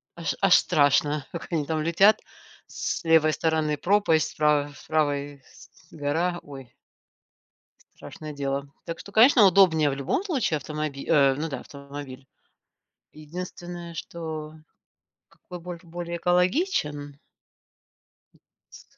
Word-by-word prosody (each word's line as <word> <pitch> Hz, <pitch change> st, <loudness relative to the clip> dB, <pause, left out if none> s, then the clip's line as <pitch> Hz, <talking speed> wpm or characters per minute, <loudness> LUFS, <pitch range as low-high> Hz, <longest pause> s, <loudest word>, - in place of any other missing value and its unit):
аж 170 Hz, -1 st, -3 dB
аж 195 Hz, -2 st, +6 dB
страшно, 145 Hz, 0 st, +2 dB
как 170 Hz, -, -7 dB
они 155 Hz, -4 st, 0 dB
там 155 Hz, 0 st, -1 dB
летят: 195 Hz, +6 st, +4 dB, 0.5 s
с -, -, -4 dB
левой 160 Hz, -1 st, +4 dB
стороны 155 Hz, -2 st, 0 dB
пропасть, 175 Hz, -5 st, +2 dB
с -, -, -14 dB
правой 150 Hz, -1 st, +2 dB, 0.2 s
правой 145 Hz, -3 st, -1 dB, 0.5 s
гора, 165 Hz, +4 st, -1 dB
ой. 135 Hz, -4 st, -12 dB, 1.2 s
Страшное 155 Hz, -1 st, -9 dB
дело. 140 Hz, 0 st, -3 dB, 0.2 s
Так 165 Hz, 0 st, -5 dB
что, 200 Hz, -, -11 dB
конечно, 225 Hz, 0 st, +7 dB
удобнее 170 Hz, -5 st, +5 dB
в 135 Hz, -, -2 dB
любом 140 Hz, -, -1 dB
случае, 265 Hz, -, 0 dB
автомобиль, 150 Hz, -1 st, -5 dB
э. 140 Hz, -4 st, +4 dB
Ну 155 Hz, +3 st, -3 dB
да 140 Hz, -, -5 dB
автомобиль. 140 Hz, -2 st, -10 dB, 0.9 s
Единственное, 175 Hz, +2 st, -8 dB
что 160 Hz, -2 st, -6 dB, 0.7 s
какой 180 Hz, -1 st, -11 dB
бо 175 Hz, 0 st, -7 dB
более 170 Hz, 0 st, -6 dB
экологичен. 175 Hz, -, 0 dB, 1.2 s
М -, -, -26 dB, 0.3 s
с -, -, -14 dB
155 Hz, 120 wpm, -25 LUFS, 145-175 Hz, 1.2 s, конечно